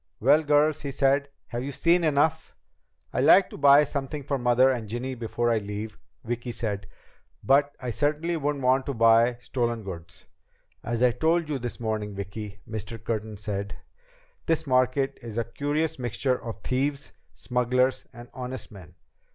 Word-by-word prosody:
"Well, 155 - +5
girls," 150 0 +2
he 140 - -4
said, 140 +1 +1 0.2
"have 120 0 -3
you 140 - -4
seen 170 +5 +2
enough?" 155 +1 +1 0.6
"I'd 130 - +1
like 185 +5 +6
to - - -8
buy 140 +1 +7
something 140 0 -4
for 140 0 -2
Mother 125 +2 +4
and 115 -5 -4
Ginny 125 +4 -3
before 120 0 -1
I 115 - +2
leave," 105 +1 -6 0.2
Vicki 120 +1 -4
said. 105 -4 -4 0.6
"But 140 +2 +3
I 125 -2 -4
certainly 150 +6 0
wouldn't 145 -3 -2
want 130 +1 +2
to 140 - -2
buy 115 +1 +4
stolen 120 -3 -2
goods." 85 -3 -9 0.6
"As 120 +1 -1
I 125 - +5
told 160 +6 +1
you 140 - -1
this 120 -1 -5
morning, 110 -3 -3
Vicki," 100 +1 -6
Mr. 110 +1 -5
Curtin 110 -2 -3
said, 100 -1 -4 0.7
"this 160 -1 +1
market 130 +1 +1
is 115 -2 -8
a 115 - +1
curious 145 +6 -2
mixture 125 +1 -1
of 115 -2 -7
thieves, 140 +2 -1 0.2
smugglers, 125 +1 0
and 120 +1 -11
honest 130 0 -6
men. 90 -6 -13
125 Hz, 165 wpm, -26 LUFS, 115-140 Hz, 0.7 s, buy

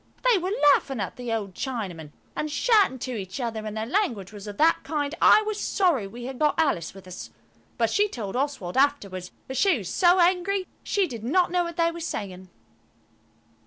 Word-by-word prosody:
They - - +4
were 365 +2 -2 0.2
laughing 270 -3 -1
at 200 - -3
the 245 -2 -5
old 210 -4 -2
Chinaman, 190 - -5 0.2
and 305 - -2
shouting 400 - +3
to 255 +1 -5
each 195 0 -5
other, 225 -3 -3
and 215 +1 -5
their 220 - -2
language 230 - -1
was 205 0 -9
of 205 -1 -7
that 325 +2 +4
kind 290 0 -2
I 430 - +7
was 425 -1 -3
sorry 340 - +1
we 235 +5 -9
had 260 0 -6
got 300 -2 +2
Alice 195 - 0
with 195 -1 -12
us. 185 -1 -8 0.5
But 230 -2 +1
she 415 +1 +3
told 215 - -5
Oswald 265 -9 -2
afterwards 200 -11 0 0.2
that 265 - -5
she 385 -7 +4
was 190 -6 -6
so 360 +1 +4
angry 370 +2 +2 0.2
she 400 -2 +1
did 235 - -7
not 345 +9 +2
know 355 -1 +2
what 340 0 -7
they 335 0 +3
were 340 - -8
saying. 190 - -5
265 Hz, 200 wpm, -25 LUFS, 205-345 Hz, 0.5 s, I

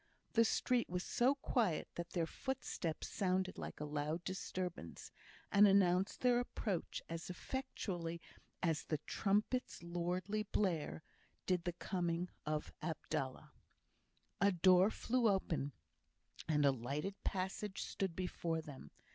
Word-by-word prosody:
The 230 -1 +6
street 245 +2 +2
was 180 +1 -1
so 255 +4 +3
quiet 230 - +1
that 170 0 -4
their 170 -2 +1
footsteps 195 - -3
sounded 185 -1 0
like - - -6
a 150 - -2
loud 150 +3 -2
disturbance, 180 - -4 0.4
and 205 +1 +8
announced 190 -1 +4
their 245 -1 +5
approach 210 -6 -2
as 165 +1 -5
effectually 180 -6 -3 0.4
as 165 -3 +2
the 155 - 0
"trumpet's 210 +3 0
lordly 175 +4 -1
blare" 180 -7 0 0.4
did 180 -2 +1
the 175 - 0
coming 175 0 -1 0.2
of 150 0 -1
Abdallah. 140 -5 -3 0.9
A 200 0 +6
door 185 +2 +6
flew 235 +1 +2
open, 165 -7 0 0.8
and 150 -2 +3
a 140 - +7
lighted 140 - -2
passage 190 +1 -2
stood 190 -4 -2
before 170 -2 -1
them. 135 - -9
180 Hz, 125 wpm, -38 LUFS, 165-200 Hz, 0.9 s, and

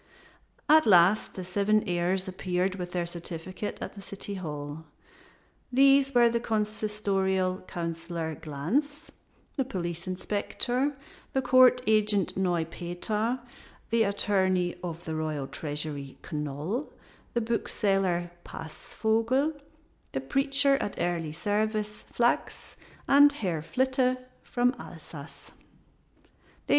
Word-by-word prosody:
At 310 -3 +6
last 185 +2 +5
the 185 - -5
seven 200 +4 +2
heirs 180 +2 0
appeared 185 0 -1
with 180 -2 -5
their 175 -1 -1
certificate 175 +3 -4
at - - -6
the 200 - -10
city 200 +1 -6
hall. 150 -4 -6 0.9
These 275 +1 +5
were 240 -1 +7
the 235 0 +1
Consistorial 210 -4 0
Councilor 165 -1 -4
Glanz, 245 - -2 0.5
the 270 - +2
Police 175 -6 -4
Inspector, 245 +8 -1 0.4
the 265 - +2
Court 255 0 +6
Agent 210 -3 +2
Neupeter, 180 +6 -1 0.5
the 230 0 +3
Attorney 190 -3 +2
of 170 -1 -5
the 160 - -3
Royal 155 -3 -2
Treasury 145 0 -4
Knol, 150 - -3 0.5
the 235 - +2
Bookseller 195 -6 0
Passvogel, 230 - -1 0.6
the 135 - -1
Preacher 275 - +3
at 205 - -3
Early 170 -2 -1
Service 210 +4 -1
Flachs, 240 0 0 0.3
and 285 +1 +7
Herr 185 - -2
Flitte 260 - +1 0.2
from 245 +1 +1
Alsace. - - -10
195 Hz, 105 wpm, -28 LUFS, 170-235 Hz, 0.9 s, were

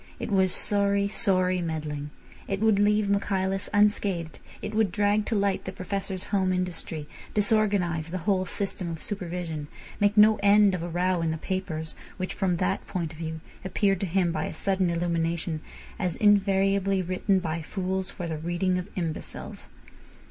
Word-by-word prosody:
It - - -4
was 190 -2 +3
sorry, 200 0 +1
sorry 185 -3 +2
meddling. 150 -3 -3 0.4
It 195 -1 -1
would 220 -1 +3
leave 210 0 +3
Michaelis 195 -1 0
unscathed; 200 -5 +1 0.2
it - - -5
would 215 -3 +2
drag 205 +2 +2
to 230 - 0
light 200 -1 +1
the 190 - -3
Professor's 190 0 -4
home 190 -2 +3
industry; 175 -4 -3 0.3
disorganise 200 -6 +2
the 185 - -3
whole 185 +1 +1
system 190 -2 -2
of 165 -1 -6
supervision; 175 -6 -4 0.3
make 205 +1 +2
no 215 0 +7
end 205 0 +6
of 180 - -2
a 175 - -4
row 180 +1 +1
in 165 - 0
the 160 - -1
papers, 160 -3 -3 0.2
which, 185 0 -3
from 185 -3 0
that 185 +2 -1
point 170 -4 -3
of 155 - -13
view, 160 -1 -4 0.2
appeared 195 0 +1
to 195 - -1
him 180 0 +2
by 155 -1 -1
a - - -5
sudden 190 +2 +1
illumination 170 -1 -1 0.4
as 180 -3 0
invariably 195 -1 +3
written 185 +2 +1
by 165 -2 -2
fools 190 +2 -2
for 180 - -6
the 160 -2 -3
reading 175 +3 0
of 180 - -6
imbeciles. 165 -4 -5
185 Hz, 170 wpm, -27 LUFS, 170-200 Hz, 0.4 s, no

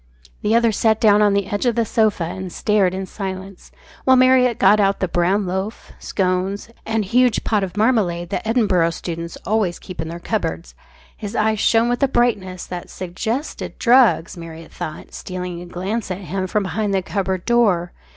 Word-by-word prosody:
The 215 +2 +2
other 235 -1 +4
sat 220 +1 +2
down 210 -3 +5
on 205 -1 +4
the 200 -1 +1
edge 205 +5 -2
of 235 - +2
the 230 -1 +1
sofa 215 -4 +1
and 185 +2 -5
stared 195 -2 +1
in 190 0 -3
silence, 190 -1 -7 0.3
while 260 - +5
Marriott 255 -2 +4
got 205 +2 +5
out 200 -1 +2
the 190 - 0
brown 180 +4 +1
loaf, 190 +4 -4
scones, 190 +2 -1 0.2
and 220 -2 0
huge 245 +3 +2
pot 210 -3 +1
of 190 +1 -5
marmalade 200 -7 +1
that - - -1
Edinburgh 205 -7 +2
students 170 0 -6
always 205 -5 0
keep 180 -4 -8
in 160 - -5
their 170 - -6
cupboards. 85 - -3 0.4
His 210 +1 -7
eyes 215 0 +1
shone 225 +2 +3
with 245 0 -1
a 275 - +4
brightness 210 -8 0
that 180 -1 -7
suggested 220 - -4
drugs, 240 -8 +4
Marriott 165 -1 -10
thought, 155 - -7
stealing 180 -1 -6
a 175 - -9
glance 190 +6 -3
at 185 +1 -4
him 190 +1 -3
from 210 +2 0
behind 200 +2 -1
the 190 - 0
cupboard 190 -2 -2
door. 205 -8 +2
195 Hz, 185 wpm, -20 LUFS, 180-220 Hz, 0.4 s, down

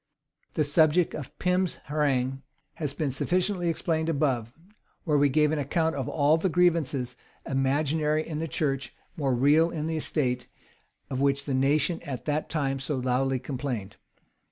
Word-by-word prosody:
The 155 - +2
subject 155 +3 +3
of 145 -5 -7
Pym's 180 0 +1
harangue 135 -3 0 0.4
has 150 -3 -1
been 145 -1 -2
sufficiently 180 +5 0
explained 160 0 -1
above; 135 -7 0 0.5
where 150 -4 +2
we 145 0 +4
gave 150 +2 +3
an 155 - 0
account 160 +2 0
of 135 -3 -3
all 150 +1 +3
the 185 +3 0
grievances, 160 -8 +1 0.3
imaginary 150 +3 +1
in 155 -2 -4
the 165 - -2
church, 135 -2 -2 0.2
more 135 -5 0
real 150 +6 +4
in 155 -3 -3
the 160 0 -1
state, 125 -5 -1 0.6
of 130 0 -1
which 140 0 +1
the 140 - -2
nation 145 +5 +2
at 140 -6 -6
that 150 0 -1
time 135 -4 -1
so 135 +2 -2
loudly 130 +1 +1
complained. 125 -6 -4
145 Hz, 155 wpm, -27 LUFS, 135-160 Hz, 0.6 s, we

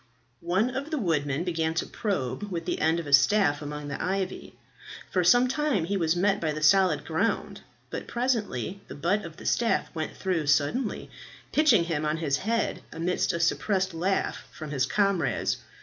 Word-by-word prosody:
One 200 +8 +2
of 280 +3 -3
the 315 - -1
woodmen 155 - 0
began 165 -2 -1
to 165 - 0
probe 200 - -3
with 170 -2 -3
the 175 - -2
end 160 +2 +2
of 170 - -5
a 145 - -3
staff 145 +1 +4
among 150 0 -6
the 140 - -4
ivy. 190 0 -3 0.5
For 185 - +2
some 245 +8 +5
time 265 - 0
he 200 +4 -1
was 165 -3 +1
met 195 +3 +1
by 155 -2 0
the 155 0 -4
solid 185 -2 +4
ground, 165 +8 -1 0.3
but - - -5
presently 210 - -2
the - - -8
butt 185 +8 0
of 165 -3 -9
the - - -11
staff 235 -1 +1
went 160 -2 -4
through 175 -6 -1
suddenly, 150 - 0 0.4
pitching 280 - +5
him 160 -3 -2
on 155 +1 0
his 145 -4 0
head, 230 +6 -1
amidst 170 +3 0
a 170 - -3
suppressed 190 +2 +1
laugh 185 +4 -1
from 155 -2 -8
his 135 -2 +1
comrades. 195 -2 +1
175 Hz, 180 wpm, -27 LUFS, 155-205 Hz, 0.5 s, some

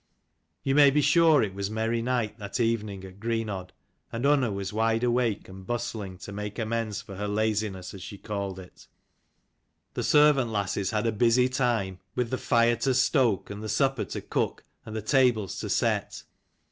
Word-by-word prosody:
You 135 - +1
may 145 0 +7
be 150 +2 +2
sure 160 -1 +5
it 100 -3 -3
was 100 0 -3
merry 110 +2 -1
night 120 -3 -1
that 100 +3 -5
evening 110 -4 -1
at 95 +1 -13
Greenodd, 110 -5 -3 0.4
and 115 +3 -3
Unna 140 -5 +3
was 100 0 -4
wide 115 +1 +1
awake 120 -3 +1
and 95 0 -11
bustling 110 -5 -4
to - - -8
made 105 0 -5
amends 110 -2 -2
for 100 -3 -10
her 105 +1 -3
laziness, 105 -3 -1
as 95 - -9
she 100 - -8
called 100 -2 -4
it. 90 -1 -13 1.1
The - - -2
servant 145 -5 +4
lasses 100 -2 -1
15 110 - -1
had 105 - 0
a 115 -2 0
busy 120 +3 +4
time, 115 -8 0 0.2
with 125 -2 -1
the 130 - -1
fire 120 0 +3
to 130 +2 +1
stoke, 130 -6 +2
and 100 +1 -6
the 110 - -5
supper 135 0 +1
to - - -5
cook, - - -2 0.2
and 110 - -6
the 110 - -3
tables 120 - +2
to - - -4
set. - - 0
110 Hz, 185 wpm, -27 LUFS, 100-125 Hz, 1.1 s, may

